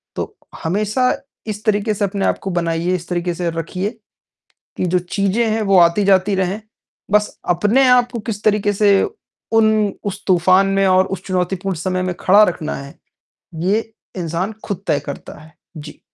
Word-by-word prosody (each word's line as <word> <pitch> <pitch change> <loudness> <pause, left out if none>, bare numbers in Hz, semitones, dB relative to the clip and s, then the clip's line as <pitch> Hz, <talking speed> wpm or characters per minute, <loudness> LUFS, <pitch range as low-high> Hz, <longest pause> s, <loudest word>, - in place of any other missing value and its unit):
तो, - - -5 0.3
हमेशा 210 +8 +1 0.4
इस 210 0 -5
तरीके 215 0 +1
से 205 0 0
अपने 195 0 -2
आप - - +1
को 195 - -4
बनाइए, 170 +2 0
इस 175 -1 -6
तरीके 175 0 -1
से 170 0 -2
रखिए, 165 +4 -3 0.9
कि - - 0
जो 180 +1 +2
चीज़े 195 +5 0
हैं 220 +1 0
वो 195 -2 +3
आती 170 +4 +4
जाती 195 0 +3
रहें, 190 +3 -1 0.5
बस 210 0 +2
अपने 210 +10 +3
आप 245 -1 +4
को 235 - -4
किस 210 -1 -4
तरीके 210 -1 +2
से 205 +1 +3 0.7
उन 215 -2 +2
उस 200 0 -4
तूफान 185 +1 +4
में 195 - +3
और 185 0 +4
उस 185 - -14
चुनौतीपूर्ण 185 0 -1
समय 185 +2 -2
में - - -2
खड़ा 200 +3 +6
रखना 170 -5 -1
है, 140 0 -9 0.6
ये 205 +7 -1 0.2
इंसान 175 +3 -2
खुद 195 -2 -4
तय 145 - +2
करता - - -8
है। 160 +1 -16 0.2
जी। 150 0 -10
195 Hz, 175 wpm, -19 LUFS, 175-210 Hz, 0.9 s, खड़ा